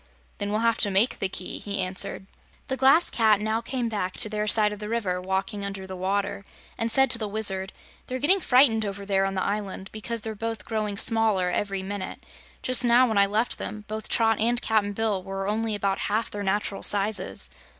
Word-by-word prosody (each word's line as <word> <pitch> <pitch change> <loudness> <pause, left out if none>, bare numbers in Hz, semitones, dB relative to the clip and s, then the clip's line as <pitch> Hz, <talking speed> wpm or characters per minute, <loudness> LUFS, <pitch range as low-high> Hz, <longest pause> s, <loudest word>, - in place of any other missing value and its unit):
"Then 205 - -2
we'll 215 +1 0
have 230 -1 +2
to 205 - +4
make 200 +6 +2
the 195 - 0
key," 185 -1 -6
he 205 -1 -4
answered. 185 0 0 0.4
The 265 - 0
Glass 270 +6 +5
Cat 220 -3 +3
now 220 +2 -1
came 250 -1 -3
back 200 -5 -2
to 215 - +1
their 210 0 -2
side 210 -1 +3
of 210 - -9
the 210 0 -6
river, 195 -6 -1
walking 190 +2 -2
under 195 -1 -5
the 190 0 -7
water, 200 +2 -2 0.3
and 230 0 0
said 270 -1 +5
to 230 - +6
the 215 - -2
Wizard: 200 -2 -1 0.4
"They're 255 - -3
getting 325 +9 +3
frightened 250 -7 +4
over 200 -1 -5
there 195 -1 +1
on 195 0 -2
the 185 - -1
island 200 -1 -4
because 225 +1 -4
they're 220 +1 -1
both 225 -2 -5
growing 215 -2 -2
smaller 220 -5 +2
every 195 +1 -2
minute. 195 -1 -6 0.4
Just 255 0 +3
now, 245 +1 +5
when 220 -3 +1
I 200 - +5
left 215 +4 -1
them, 210 -1 -6
both 215 +1 -5
Trot 225 -1 +2
and 235 +2 +2
Cap'n 215 -3 0
Bill 210 -2 -1
were 195 +1 -5
only 220 +1 -1
about 200 -1 -1
half 220 +3 -1
their 205 - -5
natural 200 0 -1
sizes." 205 +1 0
210 Hz, 210 wpm, -25 LUFS, 195-225 Hz, 0.4 s, to